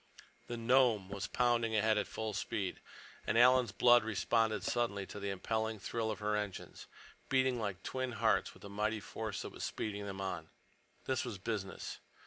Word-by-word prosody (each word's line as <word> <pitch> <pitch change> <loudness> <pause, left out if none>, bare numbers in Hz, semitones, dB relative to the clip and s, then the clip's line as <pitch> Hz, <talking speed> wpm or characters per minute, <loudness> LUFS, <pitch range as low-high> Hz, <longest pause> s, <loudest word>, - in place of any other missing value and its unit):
The 120 - -4
Nome 115 -4 +3
was 100 0 -3
pounding 120 -2 +2
ahead 110 +1 +4
at - - -2
full 110 -1 -4
speed, 95 -1 -2 0.5
and 115 - +2
Alan's 125 -1 +6
blood 120 +3 +6
responded 110 +1 +1
suddenly 110 -5 0
to 105 - -8
the 100 0 -3
impelling 110 +3 -1
thrill 110 +3 -2
of 110 - -2
her 105 +1 0
engines, 105 -3 -5 0.4
beating 130 -2 +3
like 100 -4 -3
twin 130 -1 -2
hearts 110 -3 +2
with - - -17
the - - -7
mighty 105 +2 0
force 110 0 -5
that - - -6
was - - -7
speeding 100 -1 -3
them 95 -1 -5
on. 90 -4 -4 0.6
This 130 - 0
was 120 -5 -4
business. 95 -1 -4
110 Hz, 175 wpm, -35 LUFS, 100-120 Hz, 0.6 s, Alan's